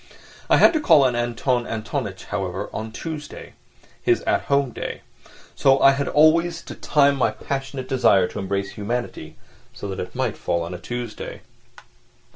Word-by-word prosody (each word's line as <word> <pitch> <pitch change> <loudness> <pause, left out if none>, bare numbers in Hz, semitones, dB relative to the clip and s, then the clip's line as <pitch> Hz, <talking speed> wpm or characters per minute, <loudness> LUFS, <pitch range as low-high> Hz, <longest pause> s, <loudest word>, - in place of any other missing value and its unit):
I - - +6
had - - +6
to 315 - +1
call 160 - +5
on 125 -2 +2
Anton 120 +1 0
Antonitch, 110 -2 -4
however, 90 0 -4
on 110 0 -5
Tuesday—his 160 - -5
at - - +1
home 140 -2 +1
day; - - -6 0.5
so 135 0 +4
I 135 - +7
had 140 0 -1
always 165 +2 +3
to - - -8
time 140 -1 +3
my 130 -4 +2
passionate 135 +3 -5
desire 120 -8 +4
to - - -6
embrace 100 0 -2
humanity 120 +4 -4 0.4
so 100 - -7
that 95 - -5
it 90 - -6
might 125 -4 -1
fall 85 -1 -1
on 85 +2 -6
a 90 - -6
Tuesday. 120 0 -6
125 Hz, 160 wpm, -23 LUFS, 105-140 Hz, 0.5 s, I